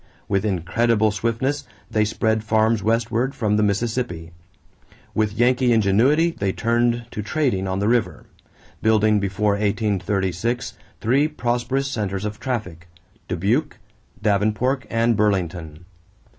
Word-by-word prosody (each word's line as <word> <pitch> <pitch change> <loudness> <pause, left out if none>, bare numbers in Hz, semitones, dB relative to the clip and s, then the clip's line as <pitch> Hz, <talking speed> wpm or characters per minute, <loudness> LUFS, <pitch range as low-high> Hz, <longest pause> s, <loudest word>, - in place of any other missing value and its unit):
With 100 +1 0
incredible 110 +4 +1
swiftness, 115 +7 -1 0.3
they 110 0 +2
spread 110 0 0
farms 110 0 +2
westward 115 +4 0
from 105 -2 0
the 105 - +2
Mississippi. 105 -5 -1 0.8
With 105 -1 0
Yankee 125 +2 +2
ingenuity 120 - +3
they 100 -11 -2
turned 120 +1 +1
to 105 - -4
trading 105 -4 -1
on 95 0 -1
the 100 +1 0
river, 120 -1 0 0.6
building 110 -1 +3
before 100 +1 0
1836 100 +1 -1 0.3
three 135 +7 +3
prosperous 130 -1 -1
centers 100 -3 -3
of 105 0 -5
traffic: 90 - -4 0.4
Dubuque, 120 - 0 0.5
Davenport, 110 +6 +1
and 115 0 +2
Burlington. 90 -6 -1
110 Hz, 115 wpm, -22 LUFS, 100-120 Hz, 0.8 s, ingenuity